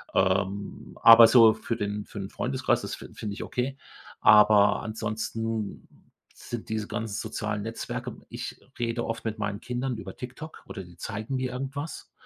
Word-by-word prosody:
Ähm, 95 Hz, +1 st, 0 dB
aber 115 Hz, 0 st, +10 dB
so 115 Hz, -3 st, +7 dB
für 115 Hz, -, -3 dB
den 105 Hz, -1 st, -3 dB
für 105 Hz, -, -8 dB
'n 95 Hz, -, -5 dB
Freundeskreis, -, -, 0 dB
das -, -, -4 dB
fi -, -, -12 dB
finde 105 Hz, -2 st, -5 dB
ich -, -, -5 dB
okay. 130 Hz, +2 st, -3 dB, 0.4 s
Aber 105 Hz, -1 st, +6 dB
ansonsten 110 Hz, 0 st, -3 dB, 0.5 s
sind 120 Hz, -2 st, -7 dB
diese 110 Hz, -1 st, -2 dB
ganzen 105 Hz, -1 st, -4 dB
sozialen 105 Hz, -2 st, -3 dB
Netzwerke 115 Hz, +1 st, -5 dB
ich -, -, -6 dB, 0.2 s
rede 120 Hz, 0 st, -1 dB
oft 115 Hz, 0 st, -4 dB
mit 110 Hz, 0 st, -2 dB
meinen 105 Hz, 0 st, -2 dB
Kindern 125 Hz, -1 st, -3 dB
über -, -, -8 dB
TikTok 130 Hz, +6 st, -9 dB
oder 95 Hz, -, -7 dB
die 85 Hz, -1 st, -16 dB
zeigen 110 Hz, +7 st, -4 dB
mir 130 Hz, -1 st, -1 dB
irgendwas. 140 Hz, +4 st, -5 dB
110 Hz, 160 wpm, -27 LUFS, 105-120 Hz, 0.5 s, aber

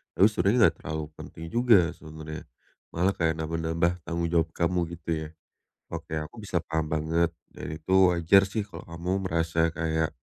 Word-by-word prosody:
Tapi 100 Hz, -, +7 dB
sebenarnya 100 Hz, +5 st, +2 dB
enggak -, -, -1 dB
terlalu 80 Hz, 0 st, -4 dB
penting 80 Hz, -, -9 dB
juga 115 Hz, -8 st, +5 dB
sebenarnya. 80 Hz, 0 st, -9 dB, 0.5 s
Malah 90 Hz, +3 st, +2 dB
kayak 80 Hz, -1 st, +1 dB
nambah-nambah 80 Hz, +1 st, 0 dB, 0.2 s
tanggung 85 Hz, 0 st, -1 dB
jawab 85 Hz, -1 st, +2 dB
kamu, 90 Hz, +1 st, +1 dB, 0.2 s
gitu, 85 Hz, 0 st, -11 dB, 0.2 s
ya. -, -, -14 dB, 0.6 s
Oke, 80 Hz, -, -4 dB
aku 75 Hz, +9 st, -6 dB
bisa 100 Hz, -4 st, -2 dB
paham 80 Hz, -1 st, -2 dB
banget 80 Hz, +2 st, +1 dB, 0.2 s
dan -, -, -7 dB
itu 80 Hz, +4 st, -3 dB, 0.2 s
wajar 90 Hz, +3 st, +4 dB
sih 105 Hz, 0 st, -2 dB
kalau 90 Hz, -4 st, -10 dB
kamu 85 Hz, +2 st, -4 dB, 0.2 s
merasa 80 Hz, 0 st, +1 dB
kayak, 80 Hz, -1 st, -1 dB
85 Hz, 165 wpm, -27 LUFS, 80-90 Hz, 0.6 s, Tapi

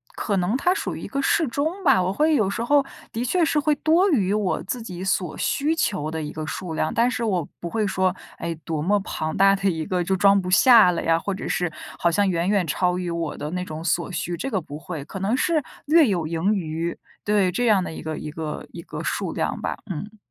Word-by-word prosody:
可 205 Hz, -3 st, -1 dB
能 185 Hz, +5 st, +1 dB
它 355 Hz, +6 st, +2 dB
属 -, -, -3 dB
于 -, -, -7 dB
一 -, -, -6 dB
个 275 Hz, -, -2 dB
适 320 Hz, +3 st, +2 dB
中 310 Hz, +10 st, -2 dB
吧。 270 Hz, -, +5 dB
我 185 Hz, +1 st, 0 dB
会 305 Hz, +7 st, +3 dB
有 215 Hz, -8 st, +2 dB
时 230 Hz, +4 st, -2 dB
候 285 Hz, +3 st, +3 dB, 0.3 s
的 235 Hz, +2 st, -2 dB
确 345 Hz, +8 st, +2 dB
是 315 Hz, -1 st, +2 dB
会 295 Hz, 0 st, +2 dB
多 330 Hz, +7 st, +3 dB
于 200 Hz, -, +2 dB
我 210 Hz, -3 st, 0 dB
自 240 Hz, +5 st, -4 dB
己 185 Hz, -5 st, -7 dB
所 185 Hz, -4 st, -1 dB
需 300 Hz, +3 st, 0 dB
求 185 Hz, -, -1 dB
的 160 Hz, 0 st, -3 dB
一 150 Hz, -, -5 dB
个 155 Hz, 0 st, -5 dB
数 170 Hz, +1 st, -5 dB
量， 155 Hz, 0 st, -1 dB
但 235 Hz, +2 st, +3 dB
是 250 Hz, -1 st, -2 dB
我 185 Hz, -8 st, 0 dB
不 170 Hz, -, -5 dB
会 220 Hz, +3 st, 0 dB
说， 190 Hz, -1 st, +1 dB, 0.2 s
哎， 170 Hz, 0 st, -3 dB
多 160 Hz, -2 st, -2 dB
么 205 Hz, +6 st, +2 dB
庞 155 Hz, -4 st, -4 dB
大 195 Hz, +1 st, +5 dB
的 195 Hz, 0 st, +1 dB
一 160 Hz, -3 st, -2 dB
个 180 Hz, +1 st, 0 dB
就 190 Hz, +2 st, 0 dB
装 200 Hz, +1 st, +5 dB
不 180 Hz, -, -5 dB
下 215 Hz, 0 st, +7 dB
了 175 Hz, -, -2 dB
呀， 165 Hz, 0 st, +3 dB
或 200 Hz, -, -3 dB
者 190 Hz, -, -5 dB
是 175 Hz, -2 st, -1 dB, 0.3 s
好 170 Hz, -, +2 dB
像 200 Hz, +2 st, +2 dB
远 170 Hz, -1 st, 0 dB
远 200 Hz, -3 st, +2 dB
超 180 Hz, +4 st, +1 dB
于 180 Hz, -1 st, -3 dB
我 170 Hz, -2 st, -3 dB
的 150 Hz, -, -4 dB
那 180 Hz, +1 st, -2 dB
种 155 Hz, -1 st, -6 dB
所 170 Hz, +2 st, 0 dB
需， 175 Hz, 0 st, -3 dB
这 270 Hz, -, -3 dB
个 200 Hz, -8 st, -1 dB
不 145 Hz, -1 st, -8 dB
会。 160 Hz, -3 st, -6 dB
可 175 Hz, +6 st, -8 dB
能 200 Hz, +5 st, +1 dB
是 310 Hz, +2 st, +1 dB, 0.2 s
略 310 Hz, 0 st, +5 dB
有 175 Hz, -6 st, 0 dB
盈 170 Hz, +6 st, +1 dB
余。 165 Hz, -3 st, -3 dB, 0.3 s
对， 205 Hz, -3 st, +2 dB
这 245 Hz, +7 st, 0 dB
样 210 Hz, -5 st, +4 dB
的 -, -, -5 dB
一 160 Hz, -, -8 dB
个 155 Hz, -1 st, -4 dB
一 -, -, -6 dB
个 155 Hz, 0 st, -5 dB
一 -, -, -8 dB
个 -, -, -7 dB
数 -, -, -2 dB
量 -, -, -2 dB
吧， -, -, -3 dB
嗯。 205 Hz, +5 st, -6 dB
190 Hz, 270 characters per minute, -23 LUFS, 170-230 Hz, 0.3 s, 下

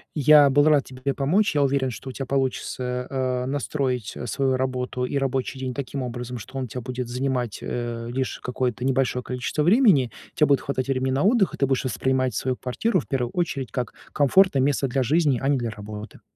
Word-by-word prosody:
Я 150 Hz, -1 st, +7 dB
был 145 Hz, +2 st, +4 dB
рад 150 Hz, -3 st, +5 dB
тебе 130 Hz, +2 st, -4 dB
помочь. 160 Hz, +9 st, +1 dB
Я 145 Hz, -, +4 dB
уверен, 135 Hz, -1 st, +1 dB
что 130 Hz, +2 st, -7 dB
у -, -, -4 dB
тя 135 Hz, -, -4 dB
получится, 125 Hz, -1 st, -2 dB
э, 130 Hz, -2 st, -1 dB
настроить, 130 Hz, -3 st, -2 dB
э, 120 Hz, -, -5 dB
свою 130 Hz, +2 st, +1 dB
работу 125 Hz, -1 st, -2 dB
и 140 Hz, -, -2 dB
рабочий 135 Hz, 0 st, -1 dB
день 130 Hz, -1 st, -3 dB
таким 140 Hz, +1 st, -4 dB
образом, 125 Hz, 0 st, -5 dB
что 130 Hz, +5 st, -9 dB
он 130 Hz, -, -2 dB
у -, -, -8 dB
тя 125 Hz, +3 st, -6 dB
будет 125 Hz, 0 st, -4 dB
занимать, 125 Hz, -2 st, -2 dB
э, 120 Hz, -1 st, -4 dB
лишь 130 Hz, +1 st, -2 dB
какое-то 125 Hz, -1 st, -2 dB
небольшое 130 Hz, -1 st, +1 dB
количество 125 Hz, +5 st, -2 dB
времени. 180 Hz, -, +4 dB, 0.2 s
Те 150 Hz, -, +4 dB
будет 140 Hz, -2 st, +3 dB
хватать 135 Hz, -1 st, -3 dB
времени 130 Hz, 0 st, 0 dB
на 135 Hz, -, +1 dB
отдых, 205 Hz, -1 st, +3 dB
и -, -, -6 dB
ты 140 Hz, -, +2 dB
будешь 135 Hz, 0 st, 0 dB
воспринимать 130 Hz, +1 st, 0 dB
свою 130 Hz, -1 st, -1 dB
квартиру 185 Hz, -, 0 dB
в -, -, -8 dB
первую 125 Hz, -3 st, -1 dB
очередь 145 Hz, -7 st, -2 dB
как 125 Hz, -3 st, -3 dB, 0.2 s
комфортное 145 Hz, +1 st, +4 dB
место 135 Hz, 0 st, +1 dB
для 135 Hz, +2 st, 0 dB
жизни, 145 Hz, -1 st, +2 dB
а 135 Hz, -, -1 dB
не 140 Hz, 0 st, +3 dB
для 120 Hz, -2 st, -2 dB
работы. 105 Hz, -1 st, -9 dB
130 Hz, 210 wpm, -24 LUFS, 125-140 Hz, 0.2 s, Я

